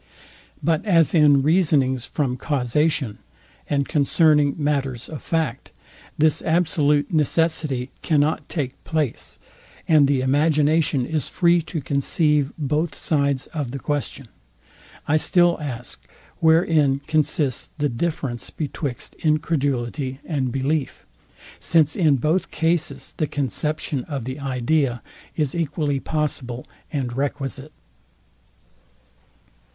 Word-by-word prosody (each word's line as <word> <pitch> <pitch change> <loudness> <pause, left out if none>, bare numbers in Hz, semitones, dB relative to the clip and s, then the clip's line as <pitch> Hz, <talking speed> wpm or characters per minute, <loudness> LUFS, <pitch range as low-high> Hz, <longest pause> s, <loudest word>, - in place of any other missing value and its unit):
But 160 +4 +1
as 170 -7 +3
in 145 -4 +5
reasonings 140 -7 +2
from 135 -5 -1
causation, 135 -3 0 0.5
and 140 -1 0
concerning 150 -1 +3
matters 140 -5 -1
of 155 - -7
fact, 155 -6 -2 0.5
this 155 0 +3
absolute 160 -2 +1
necessity 155 -4 +1
cannot 150 -1 +1
take 135 -5 -4
place, 155 -6 -2 0.5
and 150 -3 +5
the 140 -2 +2
imagination 150 0 +2
is 155 -2 -2
free 170 -1 +3
to 160 -2 -3
conceive 145 +1 +1
both 155 +2 -1
sides 140 -3 0
of 145 -6 -3
the 135 - -5
question, 145 -4 -3 0.8
I 155 - +3
still 175 +1 +3
ask, 125 -4 -6 0.4
Wherein 160 -4 +3
consists 150 -4 0
the 145 -1 +1
deference 135 -2 -3
betwixt 145 -4 -5
incredulity 140 -4 -1
and 135 -6 -1
belief? 135 +2 -2 0.5
since 155 -3 +2
in 155 -7 +3
both 155 +8 0
cases 165 -1 -1
the 155 - 0
conception 145 +1 -2
of 140 -5 -4
the 130 +3 -5
idea 130 -1 0 0.3
is 150 -4 0
equally 150 -4 -1
possible 130 -5 -3 0.3
and 130 -6 -3
requisite. 140 +1 -3
145 Hz, 110 wpm, -22 LUFS, 135-160 Hz, 0.8 s, in